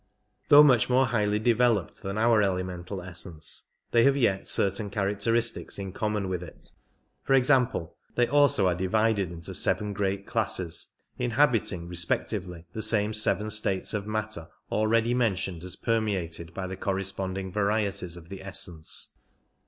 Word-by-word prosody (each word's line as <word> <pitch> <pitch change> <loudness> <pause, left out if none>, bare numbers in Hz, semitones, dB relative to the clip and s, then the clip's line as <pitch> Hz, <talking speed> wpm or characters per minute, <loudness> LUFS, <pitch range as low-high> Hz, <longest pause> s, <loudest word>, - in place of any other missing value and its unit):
Though 145 0 +9
much 130 -6 +4
more 130 +1 +4
highly 105 -4 +1
developed 115 -3 +1
than 100 +1 -4
our 115 -1 +4
elemental 90 -1 -3
essence, 85 -2 -8 0.3
they 120 - +4
have 140 0 +4
yet 100 -7 +1
certain 100 +2 +1
characteristics 105 +4 -1
in 95 -1 -5
common 105 -2 -2
with 90 -2 -3
it; 90 - -13 0.5
for 135 - +3
example, 130 - +2 0.2
they 120 - +3
also 140 -7 +4
are 90 - +3
divided 100 +1 0
into 85 -1 -6
seven 105 -1 +1
great 100 0 -2
classes, 95 -7 +1 0.3
inhabiting 115 -8 +1
respectively 90 0 -1
the 110 - -4
same 110 0 +2
seven 105 0 +1
states 100 -3 -1
of 105 -1 -3
matter 110 -6 -3 0.2
already 115 +2 +2
mentioned 95 -8 -1
as 90 -1 -3
permeated 95 -8 -2
by 95 +2 -5
the 95 +1 -5
corresponding 95 -1 -3
varieties 100 -3 -1
of 85 -1 -13
the 95 -1 -8
essence. 90 -4 -4
100 Hz, 145 wpm, -27 LUFS, 95-115 Hz, 0.5 s, Though